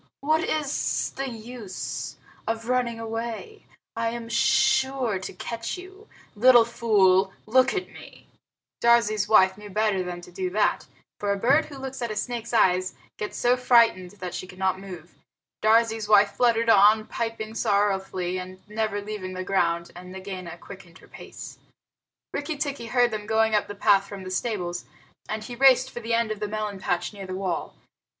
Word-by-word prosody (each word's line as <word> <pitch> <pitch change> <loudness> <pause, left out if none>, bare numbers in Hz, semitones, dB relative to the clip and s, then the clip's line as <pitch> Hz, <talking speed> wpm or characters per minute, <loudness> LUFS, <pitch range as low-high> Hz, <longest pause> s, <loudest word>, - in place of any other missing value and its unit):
What 310 +3 +2
is 300 -5 -1
the 270 0 -3
use 230 -3 -6 0.3
of 225 0 -3
running 245 -2 0
away? 230 - -6 0.3
I 230 0 0
am 230 0 -6
sure 265 -2 +2
to 185 - -7
catch 230 - -5
you. 380 +4 -12 0.3
Little 240 +1 +7
fool, 200 -5 +3
look 255 +4 +3
at 370 -1 -2
me!" - - -14 0.6
Darzee's 230 -3 +3
wife 190 -2 +5
knew 210 0 -10
better 210 -1 +1
than 180 -1 -5
to 175 - -13
do 185 0 -3
that, 205 +3 0 0.3
for 205 -1 -1
a 200 - 0
bird 270 +9 +3
who 285 - -10
looks 265 -1 -6
at 235 - -2
a 215 - -4
snake's 235 +1 -4
eyes 185 -5 +2 0.2
gets 210 - -4
so 245 +1 +3
frightened 235 -7 +4
that 185 -3 -7
she 185 - -5
cannot 185 0 -1
move. 180 -3 -10 0.5
Darzee's 220 -1 +3
wife 205 -1 +6
fluttered 230 -1 +2
on, 215 +1 +6
piping 225 -1 -4
sorrowfully, 195 -4 0
and 185 +1 -9
never 210 -1 -2
leaving 200 -3 -6
the 185 - -4
ground, 170 -3 0
and 180 +1 -10
Nagaina 185 -2 -7
quickened 185 -1 -13
her - - -18
pace. - - -11 0.7
Rikki 295 +1 -3
tikki 280 -5 -3
heard 245 +1 +3
them 210 -1 -5
going 220 0 +2
up 210 - +2
the 205 - -7
path 200 0 +3
from 200 -2 -8
the 185 - -7
stables, 185 -4 -2 0.4
and 215 0 -3
he 240 - -8
raced 260 0 +5
for - - -6
the 230 0 -1
end 230 -1 0
of 215 - -4
the 210 - -2
melon 210 -1 -4
patch 175 +1 -2
near 195 -2 -8
the 185 - -5
wall. 185 -3 -3
215 Hz, 175 wpm, -25 LUFS, 190-235 Hz, 0.7 s, Little